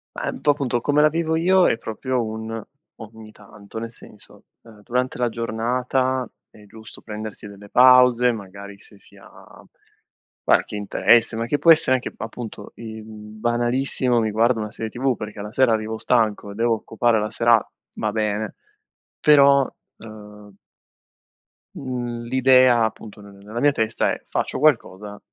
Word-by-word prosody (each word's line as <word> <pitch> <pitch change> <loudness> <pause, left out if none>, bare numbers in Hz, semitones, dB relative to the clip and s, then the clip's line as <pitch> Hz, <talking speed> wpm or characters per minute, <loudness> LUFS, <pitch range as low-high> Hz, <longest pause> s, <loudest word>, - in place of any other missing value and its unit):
Ehm, - - -4
un - - -12
po' 145 - +4
appunto 135 -4 -2
come 145 +4 +2
la 150 - +5
vivo 160 0 -1
io 185 +3 +3
è - - 0
proprio 125 +3 -3
un, 110 0 -6 0.3
ogni 110 0 -12
tanto. 105 +1 -12
Nel 115 0 -6
senso, - - -17 0.2
ehm, 110 -3 -17
durante 125 +3 -2
la 120 -1 0
giornata 125 +3 -1 0.2
è 105 - -18
giusto 110 +2 -14
prendersi 105 -1 -8
delle 100 0 -13
pause, 125 0 +5
magari 100 -2 -9
se 100 - -14
si - - -15
ha - - -17 0.8
qualche - - +1
interesse, 110 +3 +2
ma 115 +1 -2
che 145 +5 -1
può 170 - +2
essere 155 -5 +4
anche 125 - -7
appunto 115 0 -8
il 110 -1 -9
banalissimo 120 +4 -1
mi 110 -1 -1
guardo 115 +3 +2
una 105 -1 -5
serie 110 +1 -6
tv 130 +2 -1
perché 105 -1 -8
la 105 +1 -7
sera 130 0 +3
arrivo 110 0 -3
stanco 110 -4 0
e - - -10
devo 115 +2 +1
occupare 115 +1 0
la 105 0 -2
sera 115 -2 +3 0.3
va 105 - -2
bene 105 0 -2 0.6
però, 140 -2 +5 0.3
ehm 105 -2 -13 1.2
mhmm 120 -3 -5
l'idea 130 -1 +4
appunto 110 -1 -5
nel 100 -1 -14
nella 105 +4 -8
mia 145 +3 +4
testa 110 -4 -1
è: - - -6
"Faccio - - -3
qualcosa 105 -8 0
115 Hz, 160 wpm, -22 LUFS, 110-125 Hz, 1.2 s, la